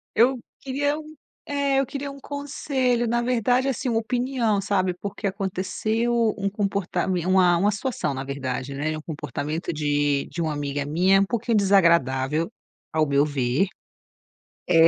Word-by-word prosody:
eu 250 +3 +4 0.2
queria 285 +2 -1
um 310 0 -11 0.3
é 280 -1 +1
eu 275 - +2
queria 280 +2 -5
um 275 - -11
conselho, 270 -4 -1
na 240 +1 +1
verdade, 250 +2 +2
assim, 260 - -2
uma 230 -2 +2
opinião, 240 -2 0
sabe, 190 -2 +1
porque 200 +3 -6
aconteceu 200 +4 -1 0.2
um 200 -1 -1
comportamen 190 -3 -1
uma 185 -2 +5
uma 200 +4 +3
situação 225 - -2
na 135 0 -4
verdade, 135 -1 -4
né, 145 +3 -2
é 155 - -3
um 155 - -7
comportamento 150 +1 -4
de 145 -2 +1
de 170 - -4
uma 160 -2 0
amiga 145 -1 -2
minha, 185 +6 +4
um - - +3
pouquinho 235 +1 -1
desagradável 165 -6 +3 0.4
ao 155 -1 +2
meu 140 +1 +3
ver, 140 +4 +1 1.0
eh 165 -1 +7
195 Hz, 155 wpm, -24 LUFS, 155-240 Hz, 1.0 s, eh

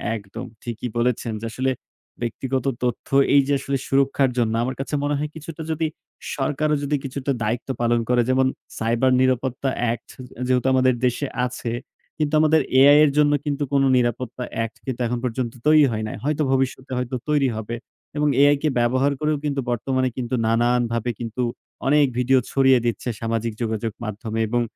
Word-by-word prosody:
একদম 110 +3 -7 0.2
ঠিকই 120 +1 -4
বলেছেন। 120 -1 0
যে, - - -5
আসলে 130 +3 0 0.5
ব্যক্তিগত 130 +2 -2 0.2
তথ্য 125 -2 -2 0.3
এই 140 - +7
যে, 145 - +2
আসলে 135 0 -1
সুরক্ষার 135 -1 +2
জন্য। 115 -2 +1
আমার 130 +2 -2
কাছে 135 - -5
মনে 145 0 +1
হয় 150 +1 -2
কিছুটা 160 +1 -8
যদি 160 0 0 0.5
সরকারও 150 +2 0
যদি 145 +1 0
কিছুটা 140 +1 -3
দায়িত্ব 115 +5 -2
পালন 120 0 +2
করে, 125 -1 +4
যেমন 130 0 +3 0.3
সাইবার 115 +3 +2
নিরাপত্তা 130 +1 +1
অ্যাক্ট 115 -1 -2
যে 125 -1 -10
যেহেতু 130 0 +2
আমাদের 130 0 +4
দেশে 125 +3 0 0.2
আছে, 120 -1 -4 0.5
কিন্তু 150 -1 -1
আমাদের 155 0 +4 0.2
AI 145 +2 +8
এর 145 - +2
জন্য 145 -1 +5
কিন্তু 145 0 -1
কোনো 135 -1 +4
নিরাপত্তা 125 0 -1
অ্যাক্ট 115 0 -2
কিন্তু 130 -2 -4
এখন 120 +1 -2
পর্যন্ত 120 -1 -2
তৈরি 155 -1 +7
হয় 110 -1 -2
নাই। - - -5
হয়তো 150 +2 0
ভবিষ্যতে 130 0 -1
হয়তো 125 0 -2
তৈরি 145 -3 +3
হবে। 110 +2 -4 0.4
এবং 150 0 +2
AI 145 +1 +6
কে 155 - +2
ব্যবহার 130 +4 +2
করেও 150 0 +1
কিন্তু 140 -1 -1
বর্তমানে 130 +2 0
কিন্তু 125 0 -2
নানানভাবে 120 0 +1
কিন্তু 115 +1 -4 0.5
অনেক 145 +1 +5
ভিডিও 130 +1 +4
ছড়িয়ে 135 -2 +5
দিচ্ছে 120 +1 -1
সামাজিক 115 0 -1
যোগাযোগ 110 -1 -1
মাধ্যমে। 110 +1 -4
এবং 120 +2 +1
130 Hz, 170 wpm, -23 LUFS, 120-140 Hz, 0.5 s, AI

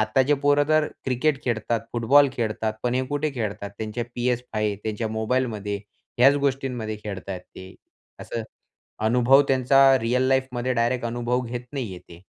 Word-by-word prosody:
आताचे 130 +6 +3
पोरं 145 +1 +3
तर 155 -1 +3 0.2
क्रिकेट 135 +2 0
खेळतात, 115 -1 -1
फुटबॉल 140 +5 +5
खेळतात, 110 -1 -1
पण 125 0 0
हे 130 +1 +1
कुठे 145 +2 -1
खेळतात 100 -4 -4
त्यांच्या 110 +2 -3
PS5 120 -4 -1
त्यांच्या 110 +1 -2
मोबाईलमध्ये 110 -2 -1 0.4
ह्याच 135 +3 +7
गोष्टींमध्ये 125 -5 -2
खेळत 100 -2 -6
आहेत 95 -2 -4
ते. 95 +1 -13 0.5
असं 115 - -4 0.6
अनुभव 125 +4 +5
त्यांचा 135 +1 +4 0.2
रिअल 120 +3 +1
लाईफमध्ये 130 -1 0
डायरेक्ट 120 +1 0
अनुभव 120 +1 -1
घेत 120 +1 -4
नाहीये 110 -10 -4
ते. 85 0 -16
120 Hz, 145 wpm, -24 LUFS, 110-130 Hz, 0.6 s, ह्याच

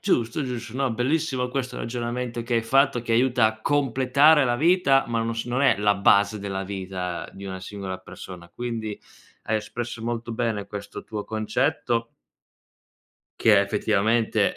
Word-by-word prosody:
Giusto, 140 - 0
giusto. 120 -3 -5
No, 135 -3 0
bellissimo 130 +1 0
questo 125 -1 -3
ragionamento 120 0 -3
che 120 0 -2
hai 115 - +2
fatto, 130 +1 +3
che 115 - -2
aiuta 120 -1 +4
a 110 0 -3
completare 140 +3 +4
la 120 -1 +1
vita 155 -4 +4
ma 115 -1 0
non 115 0 -2
s 115 - -3
non 125 +3 0
è 140 - +5
la 105 0 +3
base 100 +1 +4
della 100 -1 -4
vita 95 -2 -5
di 100 - -10
una 95 -1 -6
singola 95 -1 -6
persona, 90 -1 -11
quindi 110 +1 -5 0.5
hai 110 - +2
espresso 115 +1 -5
molto 115 0 -3
bene 115 -3 -2
questo 100 0 -7
tuo 105 -2 -5
concetto 115 +2 -1 1.3
che 110 -2 +6
è 100 - +6
effettivamente, 110 +2 +1
115 Hz, 160 wpm, -25 LUFS, 105-125 Hz, 1.3 s, che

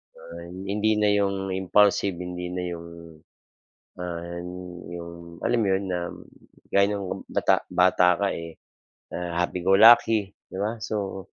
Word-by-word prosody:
Ay 85 +1 -10 0.2
hindi 105 +1 +1
na 105 -1 +3
yung 100 -1 0
impulsive 95 0 +2
hindi 90 0 -5
na 90 - -3
yung, 85 0 -7 1.1
ah, 85 -1 -5 0.6
'yong 85 0 -10
alam 120 - +2
mo 100 - +1
'yon 95 +1 +1
na 90 -1 -1 0.7
gaya 100 0 +5
ng 100 -2 -5
bata-bata 90 0 +3
ka 100 - +3
eh, 85 -1 -8 0.6
ah, 85 0 -2
happy 90 +1 -2
go 95 - +4
lucky 110 -2 +6 0.2
'di 95 - -7
ba 110 +3 -2
so 100 -3 -4
95 Hz, 135 wpm, -25 LUFS, 85-100 Hz, 1.1 s, lucky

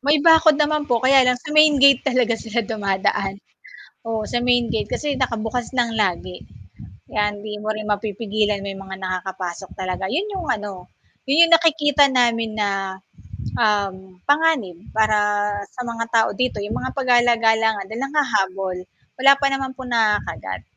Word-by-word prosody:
May 290 +4 +2
bakod 320 -2 +6
naman 300 0 0
po, 240 +1 0
kaya 265 -1 +5
lang 250 - +3
sa 300 +5 -9
main 305 0 +5
gate 275 -1 +6
talaga 250 -3 +1
sila 225 +1 -3
dumadaan, 195 -2 -1 0.7
oh, 220 -1 -2
sa 240 - -2
main 245 -2 +1
gate 220 - -2
kasi 295 -1 -2
nakabukas 235 0 -2
ng 235 -2 +1
lagi. 180 -2 -2 0.7
Kaya 210 -1 0
hindi 210 +1 -8
mo 215 +1 -3
rin 215 0 -6
mapipigilan 210 0 -1
may 195 -1 -6
mga 190 0 -8
nakakapasok 185 0 -5
talaga, 185 0 -4
'yon 335 - -2
'yong 380 -5 -5
ano, 205 -7 -4 0.4
'yon 320 +5 +5
'yong - - +6
nakikita 295 -3 +3
namin 230 -3 +1
na, 195 -2 -3 0.6
um, 195 -4 -1
panganib 285 - +1 0.2
para 210 -1 +1 0.2
sa 250 - -5
mga 230 -1 -4
tao 225 -1 +4
dito, 250 -5 -2
'yong 205 - -4
mga - - -5
pagala-gala 235 -3 +3
nga, - - -5
dahil 220 +6 -6
ang 285 - -12
hahabol. 195 -9 0 0.4
Wala 275 +1 +7
pa 275 0 -2
naman 270 -1 -3
po 260 - -9
nakagat. 225 -4 -1
225 Hz, 160 wpm, -21 LUFS, 205-265 Hz, 0.7 s, Wala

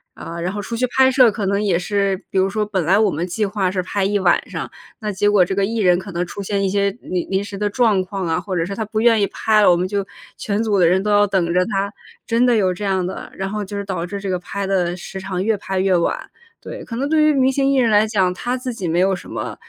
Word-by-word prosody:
啊， 170 +1 -7
然 180 +2 -2
后 205 - -5
出 230 - -5
去 255 +2 0
拍 265 0 +6
摄 255 -4 +5
可 205 -2 -3
能 200 +1 0
也 190 -5 +1
是 195 +1 -1
比 190 - +1
如 190 +1 +2
说 210 +1 -1
本 195 -4 -1
来 190 +4 +4
我 210 -3 +3
们 170 +5 -3
计 205 +4 -1
划 195 -2 -1
是 185 -1 -2
拍 195 +1 -2
1 205 +1 +1
晚 180 -3 +2
上， - - -5 0.3
那 210 -1 -3
结 205 +2 +1
果 195 -4 +4
这 190 - -3
个 200 - 0
艺 225 +4 -1
人 180 -4 +3
可 195 +1 -8
能 175 +1 -2
出 200 - -7
现 200 0 -1
一 - - +1
些 200 +1 +1
临 180 -1 -3
临 195 +1 0
时 205 - -8
的 205 +1 -1
状 210 -4 +2
况 195 0 -5
啊， 165 +1 0
或 185 +1 -4
者 165 - 0
是 200 - -5
他 220 - -2
不 215 +1 -3
愿 230 -3 +4
意 200 - +2
拍 215 -1 +2
了， - - +6
我 175 - +6
们 180 +2 -1
就 200 0 -1 0.3
全 210 +1 -1
组 205 -3 +1
的 170 - +5
人 190 +3 +2
都 210 - 0
要 205 0 +4
等 175 -3 0
着 180 - +3
他。 200 0 -2 0.3
真 230 +1 +2
的 245 - +4
有 190 -4 +2
这 205 - -7
样 190 -2 0
的， 185 - -6
然 195 - -3
后 210 -1 -3
就 205 +1 -6
是 200 - -4
导 185 -4 -3
致 200 +1 -5
这 195 - -6
个 180 - -1
拍 200 +2 -5
的 180 -2 0
时 190 +2 -8
长 190 -1 -3
越 220 -1 +2
拍 190 -1 -3
越 190 -1 +2
晚， 170 - -1 0.3
对。 - - -8
可 230 - -7
能 275 +4 -1
对 310 0 +2
于 305 - +5
明 265 -1 +3
星 275 0 +1
艺 275 - +2
人 235 -3 +3
来 215 +1 +4
讲， 190 -4 +1
他 245 +7 -3
自 255 -1 -5
己 190 -6 -4
没 165 - 0
有 190 +1 +3
什 - - -11
么， - - -5
200 Hz, 320 characters per minute, -20 LUFS, 185-215 Hz, 0.3 s, 拍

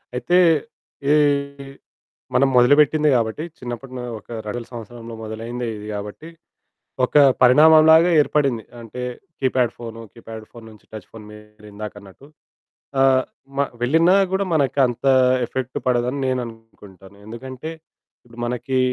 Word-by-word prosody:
అయితే 175 +8 +1 0.7
ఈ - - +6 1.2
మనం 140 - +4
మొదలుపెట్టింది 150 +4 +4
గాబట్టి 115 +5 -1 0.2
చిన్నప్పుడు 120 +1 -7
నా 125 - -6 0.2
ఒక - - -26 0.2
2000 115 +2 -5
సంవత్సరంలో 115 0 -9
మొదలైందే 115 +3 -6
ఇది 105 0 -9
గాబట్టి 105 +10 -7 0.8
ఒక 125 - -2 0.3
పరిణామం 155 +5 +7
లాగా 165 +2 +5
ఏర్పడింది. 140 -6 0 0.2
అంటే 115 +2 -8 0.4
కీప్యాడ్ 130 -3 +1
ఫోను 115 -1 -8
కీప్యాడ్ 115 -1 -10
ఫోను 115 -1 -13
నుంచి 105 -2 -18
టచ్ 110 -3 -10
ఫోను 110 -2 -11
మీరు 105 0 -16
ఇందాక 105 0 -7
అన్నట్టు 100 +7 -16 0.8
ఆహ్, 130 -1 +4 0.3
మ - - -1 0.2
వెళ్ళినా 165 +9 +4 0.2
గూడా 195 +1 0
మనకు 140 -3 +1
అంత 120 +2 -6 0.4
ఎఫెక్ట్ 130 +1 -5
పడదని 125 +2 0
నేను 130 0 0
అనుకుంటాను. 105 -4 -15
ఎందుకంటే 130 +6 -8 0.6
ఇప్పుడు 120 0 -15
మనకి 125 +2 -2
120 Hz, 130 wpm, -21 LUFS, 110-135 Hz, 1.2 s, పరిణామం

